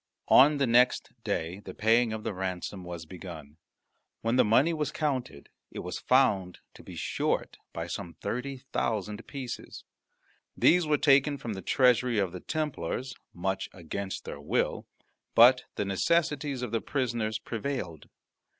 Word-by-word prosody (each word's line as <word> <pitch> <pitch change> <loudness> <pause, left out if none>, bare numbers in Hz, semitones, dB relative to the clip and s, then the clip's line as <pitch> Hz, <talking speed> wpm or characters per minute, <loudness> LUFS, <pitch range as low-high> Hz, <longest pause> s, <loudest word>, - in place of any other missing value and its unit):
On 145 +3 +7
the 140 - +2
next 125 +1 +3
day 85 +4 -2
the - - -10
paying 115 +2 +3
of 110 0 -5
the - - -2
ransom 95 0 -4
was 85 -2 -7
begun. 80 -4 -10 0.6
When 115 +2 +1
the 130 - +6
money 135 +10 +4
was 150 -2 -2
counted 130 - -3 0.2
it - - -7
was - - -5
found 100 -9 +2 0.2
to - - -14
be - - -11
short - - -2
by - - -4
some 85 - -6
thirty 130 +3 -4 0.2
thousand 105 0 -2
pieces. 130 -4 -7 0.7
These 175 -1 +4
were 150 -1 +3
taken 140 0 +4
from 120 -5 -5
the 95 - -6
treasury 125 -1 +3
of 95 -4 +1
the 90 - -7
Templars 135 - -3 0.2
much 95 +2 -2
against 95 +3 -5
their - - -7
will, - - -1 0.5
but 125 +2 +7
the 105 - -1
necessities 145 - 0
of 120 - -4
the 115 - 0
prisoners 115 -5 -1
prevailed. 110 - -5
115 Hz, 150 wpm, -29 LUFS, 95-135 Hz, 0.7 s, On